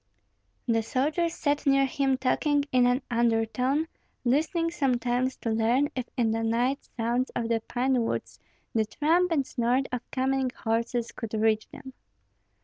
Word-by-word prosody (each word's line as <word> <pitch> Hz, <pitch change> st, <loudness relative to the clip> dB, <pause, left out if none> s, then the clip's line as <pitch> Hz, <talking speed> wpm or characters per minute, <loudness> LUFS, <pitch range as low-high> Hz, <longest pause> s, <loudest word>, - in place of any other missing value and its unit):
The 225 Hz, -1 st, +2 dB
soldiers 300 Hz, +8 st, 0 dB
sat 290 Hz, -1 st, -1 dB
near 275 Hz, 0 st, +5 dB
him 270 Hz, -1 st, 0 dB
talking 285 Hz, +2 st, +1 dB
in 250 Hz, -1 st, +4 dB
an 250 Hz, +2 st, +1 dB
undertone, 240 Hz, +6 st, +1 dB, 0.4 s
listening 320 Hz, +6 st, +1 dB
sometimes 255 Hz, -4 st, 0 dB
to 230 Hz, -, -3 dB
learn 235 Hz, +6 st, +2 dB
if 255 Hz, -2 st, -2 dB
in 230 Hz, -3 st, +2 dB
the 225 Hz, +1 st, -1 dB
night 240 Hz, +4 st, 0 dB
sounds 240 Hz, +3 st, 0 dB
of 230 Hz, -1 st, -1 dB
the 230 Hz, -1 st, +2 dB
pine 255 Hz, 0 st, +1 dB
woods -, -, -4 dB, 0.3 s
the 220 Hz, -1 st, +2 dB
tramp 330 Hz, +10 st, +2 dB
and 285 Hz, -5 st, +2 dB
snort 250 Hz, +3 st, 0 dB
of 250 Hz, -1 st, -2 dB
coming 265 Hz, 0 st, 0 dB
horses 230 Hz, +1 st, -1 dB
could 225 Hz, -2 st, -6 dB
reach 220 Hz, 0 st, +1 dB
them. 265 Hz, -2 st, -11 dB
255 Hz, 150 wpm, -27 LUFS, 230-275 Hz, 0.4 s, near